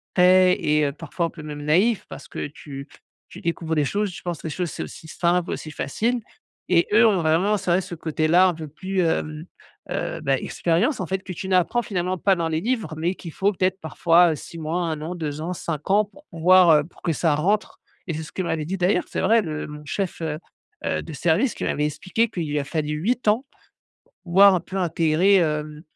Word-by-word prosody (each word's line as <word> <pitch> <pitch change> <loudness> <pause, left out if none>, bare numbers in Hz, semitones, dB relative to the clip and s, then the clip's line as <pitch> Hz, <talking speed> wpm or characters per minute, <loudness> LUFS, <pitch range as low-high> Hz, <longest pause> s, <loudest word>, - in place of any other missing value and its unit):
frais 185 0 +6
et 150 0 +2
heu, 140 - 0
parfois 165 +3 -3
un - - -8
peu 165 - -11
même 150 -1 -7
naïf 190 +9 +2
parce - - -9
que - - -5
tu 140 -1 -9 0.4
tu - - -11
découvres 165 -1 -2
des 150 -2 +2
choses, 205 +6 -1
je 175 - -9
pense 175 -4 -4
les 160 - -3
choses 175 0 -3
c'est - - -6
aussi 160 - -10
simples, 175 +2 0
aussi 155 - -5
faciles 230 - -1 0.5
et 170 -2 +4
eux 230 +3 +7
ont 205 -3 +3
vraiment, 170 +7 +2
c'est 190 -2 -4
vrai, 180 +2 +3
ce 185 -1 -8
côté-là 160 +3 +3
un 180 - +1
peu 160 -1 -7
plus, 185 +5 -2
hem, 155 -2 -1 0.5
heu, - - -3
bah, 135 0 +1
expérience, 180 - 0
en - - -2
fait, 190 +2 -1
que 190 - -6
tu 190 - -6
n'apprends 185 +6 +2
finalement 185 -4 -2
pas 195 +2 +3
dans 170 -2 -1
les 160 0 -1
livres, 225 -8 -1
mais 170 +4 -1
qu'il 165 -4 -9
faut 200 +1 +1
peut-être 185 0 0
parfois, 170 +2 +4
heu, - - -1
6 165 - -10
mois, 160 +3 -2
1 160 -3 -3
an, 160 +3 -4
2 155 -3 -4
ans, 170 +3 -3
5 165 -3 -5
ans 210 +2 +4
pour 290 +9 -20
pouvoir, 180 +1 +5
heu, 150 -1 +5
pour 170 - -19
que 170 - 0
ça 160 0 +1
rentre 200 +8 0 0.3
et 170 - -2
c'est 160 +1 -4
ce 155 - -11
que - - -2
m'avait 160 -3 -2
dit 190 +5 -3
d'ailleurs, 180 +2 +2
c'est - - -2
vrai, 225 0 +4
le 155 -5 -4
mon 150 0 -9
chef, 185 +3 -3
heu 155 -2 -2 0.5
heu, - - 0
de 165 - -8
service, 175 - +1
qui - - -5
m'avait 150 - 0
expliqué 190 +9 -1
qu'il 170 -7 -4
lui 145 0 0
a 140 - -3
fallu 150 0 -2
8 220 +11 -1
ans 225 +6 +1
pour - - -32 0.6
pouvoir 195 +2 +6
un 180 - +1
peu 185 +3 -8
intégrer, 170 +1 +3
hem, 150 -3 -1
170 Hz, 235 wpm, -23 LUFS, 155-190 Hz, 0.6 s, eux